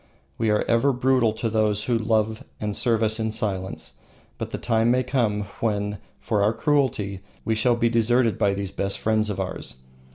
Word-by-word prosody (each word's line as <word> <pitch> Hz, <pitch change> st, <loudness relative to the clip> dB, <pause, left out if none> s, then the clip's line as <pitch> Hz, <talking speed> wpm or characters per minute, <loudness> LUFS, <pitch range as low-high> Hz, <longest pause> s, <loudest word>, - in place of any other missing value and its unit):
We 110 Hz, -, +1 dB
are 105 Hz, 0 st, +2 dB
ever 115 Hz, +5 st, +3 dB
brutal 125 Hz, -2 st, +2 dB
to 115 Hz, +1 st, -2 dB
those 105 Hz, -2 st, +1 dB
who 120 Hz, -, 0 dB
love 110 Hz, -1 st, 0 dB, 0.2 s
and 105 Hz, -1 st, -3 dB
serve 115 Hz, -2 st, +1 dB
us 110 Hz, +1 st, +1 dB
in 110 Hz, 0 st, 0 dB
silence, 95 Hz, -4 st, -4 dB, 0.4 s
but -, -, -4 dB
the -, -, -4 dB
time 115 Hz, 0 st, +1 dB
may 125 Hz, +1 st, +3 dB
come 120 Hz, -5 st, 0 dB, 0.2 s
when, 105 Hz, -2 st, -1 dB, 0.2 s
for 105 Hz, -3 st, 0 dB
our 105 Hz, +2 st, +3 dB
cruelty, 125 Hz, -10 st, 0 dB, 0.3 s
we 110 Hz, -, +1 dB
shall 120 Hz, +2 st, +2 dB
be 120 Hz, 0 st, +2 dB
deserted 115 Hz, 0 st, +2 dB
by 100 Hz, -1 st, +2 dB
these 100 Hz, -1 st, -4 dB
best 100 Hz, 0 st, -2 dB
friends 110 Hz, -1 st, +1 dB
of 105 Hz, -, -3 dB
ours. -, -, -4 dB
110 Hz, 190 wpm, -24 LUFS, 105-120 Hz, 0.4 s, ever